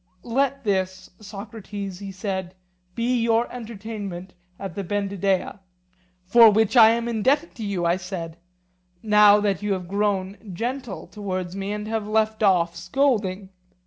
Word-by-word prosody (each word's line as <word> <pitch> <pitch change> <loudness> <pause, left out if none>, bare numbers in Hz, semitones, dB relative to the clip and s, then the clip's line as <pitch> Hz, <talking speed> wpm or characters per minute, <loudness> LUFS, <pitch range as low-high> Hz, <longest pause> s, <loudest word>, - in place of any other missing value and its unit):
Let 275 +3 0
this, 185 -3 -2
Socrates, 205 -2 -7
he 200 -1 -7
said, 190 -1 -4 0.4
be 240 +1 +1
your 230 +1 +2
entertainment 210 -6 -7 0.2
at 195 -3 -6
the 200 - -4
Bendidea. 200 0 -1 0.7
For 230 +4 +8
which 220 +2 +2
I 225 -2 +9
am 230 +1 0
indebted 260 +8 +1
to 225 - -5
you, 195 -4 -2
I 170 +2 +2
said, 175 -3 -6 0.7
now 210 -1 +6
that 200 -2 0
you 205 -1 0
have 185 -2 -4
grown 200 0 -1
gentle 240 +2 -4
towards 185 -3 -5
me 195 +1 -3
and 210 0 -4
have 220 -1 -2
left 220 0 +1
off 175 -4 +3
scolding. 195 0 0
205 Hz, 145 wpm, -24 LUFS, 190-225 Hz, 0.7 s, I